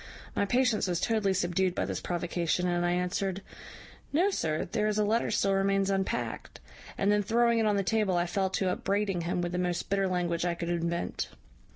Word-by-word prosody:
My - - +2
patience 245 -1 +2
was 175 -2 0
totally 215 -4 +1
subdued 180 0 +1
by - - 0
this - - -3
provocation, 175 0 -1
and 175 0 +1
I 175 0 +2
answered, 185 +2 -1 0.7
`No, 365 +7 +2
sir, 155 - -1
there 215 +3 -1
is 210 0 0
a 210 - +3
letter 225 +3 +1
still 195 0 +1
remains 195 0 +2
unpacked;' 190 -12 -2 0.4
and 200 +1 +2
then 210 0 +3
throwing 235 +3 +2
it 220 - +2
on 210 - +2
the 200 - +1
table 205 -2 +1
I 175 - +2
fell 190 +2 0
to 185 0 0
upbraiding 195 -1 -1
him 175 +1 -1
with 175 0 -2
the 180 - -2
most 180 +1 -2
bitter 195 -1 +2
language 175 -2 -1
I 175 -1 0
could 170 0 -4
invent. 170 0 -2
190 Hz, 205 wpm, -29 LUFS, 175-205 Hz, 0.7 s, a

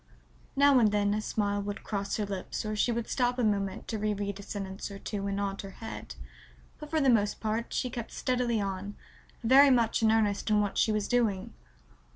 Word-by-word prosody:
Now 280 -1 +6
and 215 -3 +4
then 205 0 +2
a 215 - -1
smile 205 -1 -1
would 205 0 -5
cross 200 -2 -2
her 210 - -1
lips 195 +1 -4
or 215 0 -2
she 225 +3 +2
would 235 -1 -2
stop 245 -1 0
a 250 - 0
moment 200 -2 -1
to 220 - -2
reread 205 -1 -2
a - - -6
sentence 195 -1 -6
or 200 - -8
two 200 0 -4
and 200 0 -2
nod 200 -1 -2
her 195 - -8
head, 225 - -7 0.6
but 300 - -9
for 315 - +1
the 275 - +2
most 210 -5 +3
part 220 +1 -2
she 250 - -1
kept 235 -2 -6
steadily 245 -3 0
on, 200 0 -4 0.5
very 270 +4 +7
much 235 -4 +3
in 220 -1 +4
earnest 215 -2 +1
in 210 -1 +4
what 205 -1 -1
she 220 - +3
was 215 -1 0
doing. 225 -6 0
210 Hz, 210 wpm, -29 LUFS, 200-235 Hz, 0.6 s, very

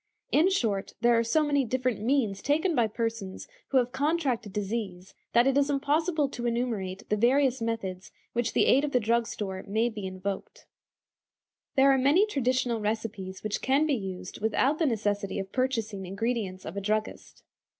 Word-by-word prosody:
In 330 +5 +4
short, 220 - -1
there 240 0 +5
are 230 - +3
so 305 +7 +2
many 285 -2 +2
different 250 -2 -1
means 225 -5 +1
taken 320 +6 +1
by 240 -6 +3
persons 225 -3 -4 0.2
who 270 - +1
have 245 -1 +2
contracted 270 - 0
disease 195 -2 -4 0.2
that 235 +1 +5
it 270 0 +3
is 285 0 +3
impossible 295 +2 +1
to 240 -2 -4
enumerate 225 -6 -2
the 210 - +2
various 255 +3 +3
methods 195 -5 -3
in - - -39 0.2
which 235 -1 -1
the - - +3
aid 275 +3 +4
of 295 - -2
the 250 - +4
drug 230 +1 +1
store 190 -2 -5
may 220 +4 +1
be 210 -4 -5
invoked. 190 +1 -6 1.1
There 275 +1 +6
are 270 - +3
many 295 +10 +4
traditional 255 - 0
recipes 210 -3 -3
which 215 -1 -2
can 275 +4 +3
be 305 - +1
used 190 -5 -5
without 255 +7 +1
the 325 - +3
necessity 205 -4 -1
of 195 -1 -4
purchasing 225 -7 -1
ingredients 200 -1 -3
of 170 - -6
a 200 - -3
druggist. 215 +2 -3
230 Hz, 180 wpm, -28 LUFS, 205-270 Hz, 1.1 s, There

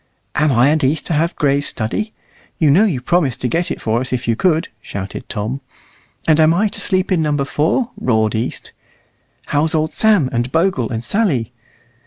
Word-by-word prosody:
"Am 150 0 +2
I 125 +2 +4
and 155 0 +1
East 150 +3 +1
to 170 - -2
have 165 +3 0
Gray's 140 -1 +1
study? 130 - -2 0.5
You 155 -3 +3
know 190 +9 +5
you 165 - 0
promised 145 -3 +1
to 125 - 0
get 170 +8 -1
it - - -4
for 115 +2 0
us 130 - -4
if 125 -1 -2
you 115 - +2
could," 165 +4 +1
shouted 100 0 -7
Tom. 115 +5 -3 0.7
"And 160 -1 +4
am 160 +1 +5
I 210 +4 +2
to - - -3
sleep 185 0 +1
in 180 -3 +2
Number 145 -2 0
4?" 165 - 0
roared 110 -3 +1
East. 110 +2 -4 0.8
"How's 155 +3 +1
old 155 0 0
Sam, 210 -10 +3
and 120 +2 -1
Bogle, 165 - +1
and 115 0 -4
Sally?" 170 - 0
150 Hz, 195 wpm, -18 LUFS, 125-170 Hz, 0.8 s, know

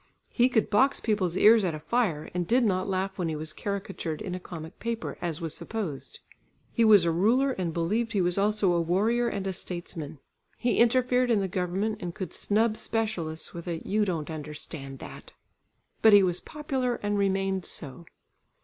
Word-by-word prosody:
He 245 +1 +3
could 220 -4 +1
box 265 +7 +4
people's 190 -5 0
ears 220 0 +6
at 175 -4 0
a - - -6
fire, 175 -4 -1
and 175 -1 -2
did 245 +5 +3
not 185 -3 +1
laugh 190 +1 -2
when 170 -2 0
he 155 - -2
was 155 0 -6
caricatured 195 -5 -4
in 195 -4 -5
a 180 - -3
comic 165 -2 -9
paper, 230 0 -3
as 170 -2 -3
was 165 -2 -3
supposed. 195 -11 -5 0.5
He 235 - +2
was 210 -5 +7
a 170 - +2
ruler 235 +11 +3
and 185 -8 -2
believed 210 +9 -1
he 205 - +1
was 175 0 +1
also 205 -2 +2
a 170 - +2
warrior 215 +8 +1
and 200 -3 -4
a 190 - -1
statesman; 170 -4 -6 0.4
he 240 -1 +1
interfered 250 +1 +3
in 225 -3 +3
the 195 - 0
government 190 +4 -2
and 175 -1 -5
could 190 -5 -5
snub 215 +1 +1
specialists 185 -9 -3
with 170 +1 -8
a 170 -1 -2
"You 210 +2 +2
don't 165 -6 -2
understand 150 -2 -7
that!" - - -11 0.7
But 220 -1 +7
he 200 -1 +8
was 180 -1 0
popular 265 -5 -2
and 205 0 0
remained 195 -1 0
so. 145 +2 -6
195 Hz, 190 wpm, -28 LUFS, 170-220 Hz, 0.7 s, he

